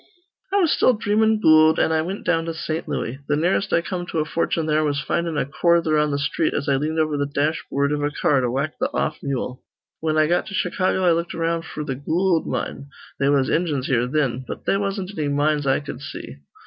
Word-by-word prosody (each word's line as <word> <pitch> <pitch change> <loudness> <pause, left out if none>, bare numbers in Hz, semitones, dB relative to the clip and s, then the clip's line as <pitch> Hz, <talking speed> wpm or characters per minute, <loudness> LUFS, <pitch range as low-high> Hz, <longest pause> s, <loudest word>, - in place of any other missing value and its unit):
"I - - 0
was 345 -6 +3
still 255 - +4
dreamin' 220 0 +2
goold, 155 -4 +6
an' - - +2
I 160 0 +2
wint 185 +5 -5
down 165 -2 +1
to 165 -1 -4
Saint 160 0 -4
Looey. 125 +4 -3
Th' 145 - +2
nearest 185 +5 +1
I 170 - +3
come 175 0 -4
to 165 - -4
a 155 - +1
fortune 165 0 -1
there 155 0 +2
was 145 -2 0
findin' 170 +2 -1
a - - +1
quarther 165 +2 +2
on 150 0 +2
th' 140 -1 -1
sthreet 150 +3 0
as 140 - -2
I 140 -1 +3
leaned 155 +3 -2
over 155 -2 +1
th' 140 - -4
dashboord 140 -1 0
iv 150 0 -1
a 145 - +1
car 145 -2 +1
to 125 - 0
whack 140 +5 -2
th' - - 0
off 155 - -1
mule. 130 -2 -3 0.4
Whin 155 -1 0
I 155 - +5
got 175 +3 +1
to 200 - -6
Chicago, 185 -2 0
I 175 - +5
looked 170 +1 -1
around 165 0 -1
f'r 150 -1 -6
the 135 - -2
goold 165 +6 0
mine. 140 - -4 0.3
They 140 - +2
was 140 -2 +3
Injuns 150 -6 0
here 125 -3 +1
thin. 130 -3 0
But - - -7
they - - +2
wasn't 195 0 -3
anny 150 -2 -1
mines 145 0 +1
I 135 - +3
cud 140 -2 -8
see. 70 - -8
155 Hz, 240 wpm, -22 LUFS, 140-170 Hz, 0.4 s, goold